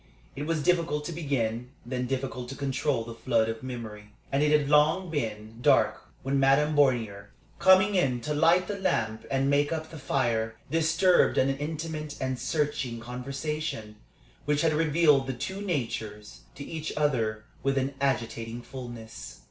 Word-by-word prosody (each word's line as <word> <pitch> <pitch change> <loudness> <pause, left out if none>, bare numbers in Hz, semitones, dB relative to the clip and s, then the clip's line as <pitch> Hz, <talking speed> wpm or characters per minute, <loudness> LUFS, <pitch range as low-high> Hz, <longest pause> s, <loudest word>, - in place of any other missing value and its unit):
It 145 +2 -4
was 165 -3 0
difficult 165 -3 +1
to - - -4
begin, 125 -7 -2 0.2
then 125 0 -2
difficult 130 -1 -3
to 135 - -6
control 135 -2 -1
the 115 0 -8
flood 115 -1 +1
of 115 0 -4
memory; 110 -5 -7 0.2
and 135 - +2
it 150 0 +3
had 150 -2 +3
long 155 +5 +3
been 110 -5 -4
dark - - +3 0.2
when 135 +1 +1
Madame 140 +3 +4
Bornier, 115 -8 +2 0.3
coming 190 +2 +6
in 135 -10 +2
to 150 +5 -2
light 165 +4 +4
the 205 -1 -4
lamp 110 - -1
and 135 0 +1
make 145 +1 +2
up 160 -1 -3
the 160 - -8
fire, 115 -5 0 0.2
disturbed 165 +3 +3
an 135 +1 +3
intimate 155 0 -4
and 130 -1 -2
searching 140 -3 -1
conversation, 125 -1 -4 0.5
which 150 0 +1
had 160 -1 +3
revealed 150 -3 +3
the 135 - -1
two 190 +11 -5
natures 110 - -4 0.2
to 140 - -7
each 160 -1 -5
other 115 -8 0 0.2
with 135 0 0
an 135 +1 0
agitating 115 -3 -2
fulness. 120 - -9
135 Hz, 160 wpm, -28 LUFS, 120-155 Hz, 0.5 s, coming